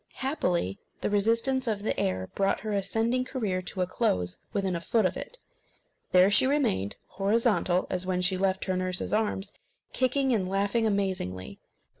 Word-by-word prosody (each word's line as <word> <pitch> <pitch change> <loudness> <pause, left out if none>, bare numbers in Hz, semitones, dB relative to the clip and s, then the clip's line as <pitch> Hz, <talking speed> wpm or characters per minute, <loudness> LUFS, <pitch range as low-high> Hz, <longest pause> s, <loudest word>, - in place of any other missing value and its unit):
Happily, 180 - -1 0.2
the - - -1
resistance 230 +5 +2
of 210 -2 -1
the - - -1
air 95 0 -1
brought 195 -1 +1
her 215 0 -3
ascending 225 +5 0
career 215 -8 -2
to 185 +1 -4
a - - 0
close 90 - 0
within 195 -3 -1
a 170 - -3
foot 220 +4 +1
of 185 - +1
it. - - -7 0.7
There 185 +2 +6
she 260 - +5
remained, 105 - 0
horizontal 200 -2 +1
as 185 0 0
when 180 -1 0
she 185 +1 +3
left 190 0 0
her 185 - 0
nurse's 185 0 -2
arms, 210 -2 -1 0.3
kicking 260 +1 +2
and 190 -5 0
laughing 200 +4 +1
amazingly. 185 - -2
195 Hz, 165 wpm, -28 LUFS, 185-230 Hz, 0.7 s, There